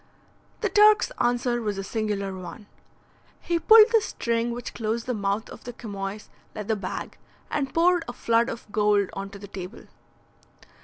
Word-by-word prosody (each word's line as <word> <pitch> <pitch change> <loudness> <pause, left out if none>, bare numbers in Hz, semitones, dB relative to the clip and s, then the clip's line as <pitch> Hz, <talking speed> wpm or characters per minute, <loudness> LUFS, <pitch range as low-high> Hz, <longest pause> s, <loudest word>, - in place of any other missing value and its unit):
The 425 - +1
Turk's 420 +2 +5
answer 240 0 +1
was 210 -3 -2
a 195 - -3
singular 200 -2 -2
one. 185 +3 -9 0.7
He 340 -1 -1
pulled 440 +5 +8
the 450 -2 +5
string 235 - -1
which 240 +1 -5
closed 225 +1 -2
the 250 - -1
mouth 205 0 -1
of - - -11
the 245 - -7
chamois 205 -2 -6 0.3
leather 215 +1 -2
bag, 195 -3 -6 0.3
and 275 -2 -1
poured 345 0 +3
a 240 - -5
flood 235 -1 +1
of 230 - -7
gold 205 -2 +2
on 195 0 -5
to 200 - -10
the 200 0 -10
table. 190 +2 -8
230 Hz, 165 wpm, -25 LUFS, 200-245 Hz, 0.7 s, pulled